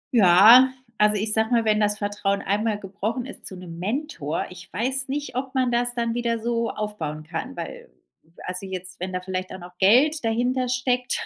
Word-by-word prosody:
Ja, 220 +6 +8 0.3
also 210 0 +4
ich 210 +1 0
sage 220 0 +2
mal 235 -2 +2
wenn 215 -1 +3
das 210 0 +2
Vertrauen 205 -1 -1
einmal 210 +2 0
gebrochen 205 +5 -4
ist 270 - -8
zu 190 - -8
'nem 170 -2 -9
Mentor, 205 - -3
ich 180 +1 -12
weiß 265 +6 -1
nicht 285 -1 -4
ob 265 +1 -4
man 255 -2 +2
das 240 0 0
dann 235 -1 -1
wieder 235 -1 -1
so 230 0 -1
aufbauen 165 -8 -4
kann 180 - -6
weil - - -7 0.6
also 180 +1 -4
jetzt 185 -1 -7
wenn 185 +1 -4
da 185 - -2
vielleicht 185 0 -4
auch - - -6
noch 180 0 -12
Geld 260 +10 +4
dahintersteckt 250 +2 0
215 Hz, 185 wpm, -24 LUFS, 190-245 Hz, 0.6 s, Ja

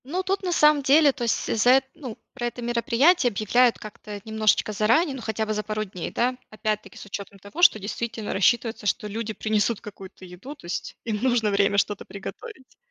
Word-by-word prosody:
Ну, 355 +8 -2
тут, 390 +1 -1
на 365 - -1
самом 300 -3 +4
деле, 285 +2 +5
то 255 - -6
есть 230 - 0
за 230 +3 +4
э - - +2
ну, 250 -7 -8 0.2
про 240 -2 -3
это 240 +1 -7
мероприятие 240 +6 +3
объявляют 235 +3 +2
как-то 210 -1 -9
немножечко 220 -1 +1
заранее, 230 - +2
ну, 260 - -7
хотя 220 -1 -2
бы 215 - -2
за 210 - -1
пару 215 +1 -3
дней, 185 -4 -6
да, 250 +2 0
опять-таки 215 -1 -4
с - - -10
учетом 200 0 -7
того, 205 - -8
что 350 - +7
действительно 220 +2 -4
рассчитывается, 220 +2 +1
что 210 - 0
люди 220 +1 -4
принесут 215 +1 0
какую-то 195 -2 -11
еду, 185 +11 -10
то 285 - -17
есть 175 - -5
им 220 -2 -2
нужно 240 -4 +2
время 200 0 +2
что-то 205 0 0
приготовить. 260 - -10
220 Hz, 200 wpm, -24 LUFS, 210-255 Hz, 0.2 s, что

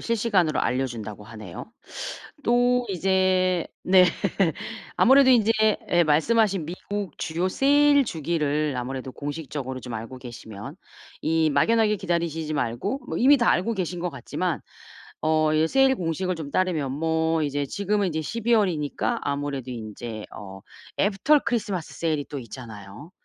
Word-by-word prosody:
실시간으로 205 - +1
알려준다고 115 -5 -2
하네요. 105 -5 -9 0.8
또 245 +1 +3
이제 185 -1 +2 0.2
네. 185 0 +6 0.9
아무래도 265 +1 +6
인제 225 -3 +5 0.4
예 175 0 +5
말씀 155 +10 +2
하신 195 -6 +1
미국 190 +1 -5
주요 170 +3 -1
세일 285 +4 +4
주기를 150 - -1
아무래도 130 +1 -4
공식적으로 145 -3 -5
좀 125 -1 -7
알고 115 +4 -6
계시면 120 - -9 0.5
이 160 0 +2
막연하게 220 +5 +3
기다리시지 165 -3 -2
말고 140 - -2
뭐 - - -3
이미 275 +4 +6
다 240 - +2
알고 225 +6 +1
계신 180 -3 -3
것 175 0 -2
같지만 140 -6 -3 0.6
어 155 0 +2
이 155 +1 +3
세일 270 -1 +4
공식을 180 +2 -2
좀 155 -3 -6
따르면 160 -8 0
뭐 160 +2 0
이제 145 -1 -1
지금은 200 +4 0
인제 160 -2 -2
12월이니까 205 -7 0
아무래도 140 -2 -3
인제 110 -1 -7
어 95 -1 -9 0.4
애프터 215 +9 +3
크리스마스 205 -8 -2
세일이 155 -4 -1
또 145 - -5
있잖아요. 110 - -10
160 Hz, 315 characters per minute, -25 LUFS, 140-200 Hz, 0.9 s, 네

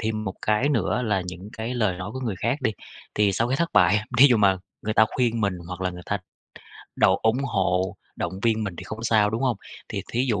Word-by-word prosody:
thêm 110 -1 -2
một 95 - -4
cái 110 +7 +2
nữa 125 -2 +1
là 105 -5 0
những 90 +2 -8
cái 115 +3 -3
lời 105 -7 +1
nói 95 +3 -5
của 130 - -5
người 115 -7 -2
khác 130 +5 -1
đi. 110 - +2 0.4
Thì 105 -1 +3
sau 115 +5 0
cái 130 - +1
thất 170 +1 -1
bại, 100 +1 +5 0.2
thí 140 - +10
dụ 125 -4 +5
mà 100 -3 +4 0.3
người 110 0 -2
ta 110 - +6
khuyên 115 -3 +1
mình 100 -2 +1
hoặc 90 0 -6
là 95 -1 0
người 90 0 -9
ta 100 - -1 0.8
độ - - +4
ủng 110 +2 +3
hộ, 95 -5 0 0.2
động 85 - -3
viên 110 -2 +2
mình 100 -3 -4
thì 95 - -8
không 110 +4 -7
sao, 110 -2 +3
đúng 110 +4 -2
hông? 125 -3 +1 0.3
Thì - - -4
thí 125 +3 +1
dụ 105 -3 +1
110 Hz, 250 wpm, -25 LUFS, 95-115 Hz, 0.8 s, thí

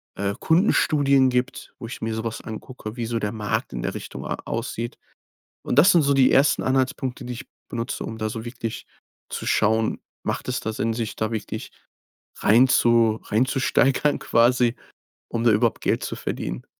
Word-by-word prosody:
äh, 100 0 -1
Kundenstudien 145 -6 +3
gibt, 125 0 -2
wo 115 - -6
ich 120 - -8
mir 110 0 -2
so 110 - -3
was 115 -1 -4
angucke, 110 0 -8
wie 115 - -2
so 115 0 -2
der 105 -1 -2
Markt 105 - -2
in - - -4
der - - -2
Richtung - - -7
a - - -2
aussieht. 115 0 -4 0.7
Und - - -1
das 180 +7 +7
sind 170 - +5
so 140 0 +3
die 135 -2 +5
ersten 140 +2 +4
Anhaltspunkte, 130 -1 -1
die 125 - -4
ich 125 - -9 0.2
benutze, 115 +1 -4
um 110 - -6
da 110 0 -1
so 110 +1 -6
wirklich 115 -2 -5 0.4
zu - - -5
schauen, 110 +1 +2 0.2
macht - - -3
es 125 - -1
da 110 - -4
Sinn 115 +1 -1 0.2
da 110 +1 -1
wirklich 110 - -5 0.7
reinzu 115 -1 +4
reinzusteigern 135 +4 +2
quasi, 120 +1 +3 0.5
um 115 0 -2
da 115 - +6
überhaupt 105 - +2
Geld - - +1
zu - - -4
verdienen? - - -4
120 Hz, 175 wpm, -24 LUFS, 110-130 Hz, 0.7 s, das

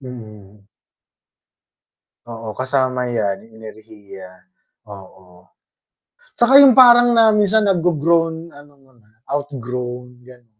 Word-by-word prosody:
Mhm. 105 -5 -14 1.6
Oo, 115 -1 -9
kasama 130 -1 -2
'yan 105 -4 -4
'yung 115 - -23
enerhiya, 105 -3 -14 0.6
oo. 95 -2 -17 0.9
'Tsaka 250 +3 +3
'yung 275 -2 +6
parang 240 -1 +5
na 225 -1 +4
minsan 210 +1 +1
na-grogrown 165 -2 -1
ano 145 -1 -19
mo 135 - -28
na, 110 -2 -30 0.2
outgrown, 125 -3 -7
gan 125 -1 -19
125 Hz, 100 wpm, -17 LUFS, 110-165 Hz, 1.6 s, yung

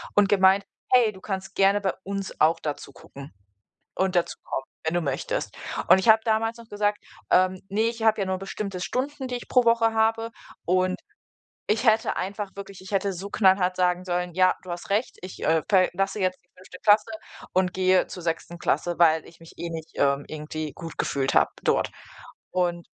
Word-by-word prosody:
und 205 -1 +5
gemeint: 195 0 +4 0.3
„Hey, 235 -4 +5
du 190 - -14
kannst 195 -1 -5
gerne 195 +1 +4
bei 190 - 0
uns 195 0 -5
auch 160 +2 +4
da 150 -2 -3
zugucken 140 -2 -12 0.6
und 190 -1 0
dazukommen, 150 -5 -2 0.2
wenn 160 +2 -1
du 175 - +2
möchtest.“ - - -3 0.3
Und 190 - +8
ich 205 - -2
habe 220 0 +7
damals 225 +1 0
noch 230 -1 -13
gesagt: 205 0 0 0.3
„Ähm, 185 0 +3
ne, 210 +3 0
ich 230 0 -1
habe 220 -1 +3
ja - - -2
nur 190 0 -1
bestimmte 195 -1 -5
Stunden, 265 +5 -3
die 250 - -3
ich 245 - -8
pro 250 -2 +4
Woche 230 -1 +3
habe 225 +1 +1 0.4
und“ 185 +1 +1 0.7
Ich 220 +2 +1
hätte 220 +1 +3
einfach 200 +1 -4
wirklich 195 -1 -9
ich 190 - -11
hätte 195 0 +1
so 190 +3 -6
knallhart 190 -2 +3
sagen 180 0 +1
sollen: 180 -1 -2
„Ja, 185 0 +4
du 185 - -10
hast 175 +5 -6
recht, 215 +5 0
ich, 185 - -9
äh, 160 0 +3
verlasse 195 +1 +2
jetzt 185 0 0
die 175 - -38
5. 185 0 -13
Klasse 210 +1 +4 0.4
und 185 -1 +2
gehe 185 0 +3
zur 180 - -8
6. 170 +1 -3
Klasse, 175 -1 0
weil 160 -2 +5
ich 165 0 -17
mich 165 - -14
eh 170 - -4
nicht, 160 -1 -7
ähm, 140 0 +1
irgendwie 155 0 -5
gut 165 -2 -8
gefühlt 135 -1 0
habe - - +4
dort.“ - - +2 0.6
Und 175 -2 -1
190 Hz, 195 wpm, -25 LUFS, 175-210 Hz, 0.7 s, Und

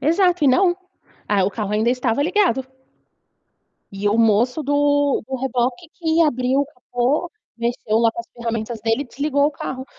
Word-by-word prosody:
Exato, 345 +2 +2
e - - +6
não. 350 +6 +3 0.5
Ah, 200 -2 +2
o 195 - 0
carro 210 0 -4
ainda 220 +3 +2
estava 250 +1 0
ligado. 350 -6 +1 1.3
E 195 +1 -2
o 215 - +1
moço 230 +6 +2
do 285 0 +2
do 265 - -3
reboque 255 +4 -2
que 325 -1 +1
abriu 260 -2 +2
o - - -2
capô, 260 +4 -2 0.3
mexeu 235 -2 -1
lá 230 -1 +4
com 235 - -8
as 235 - -6
ferramentas 230 -1 -4
dele 225 +4 0
e 285 - -5
desligou 285 +2 0
o 300 - +1
carro, 260 -2 -6
260 Hz, 175 wpm, -21 LUFS, 230-290 Hz, 1.3 s, e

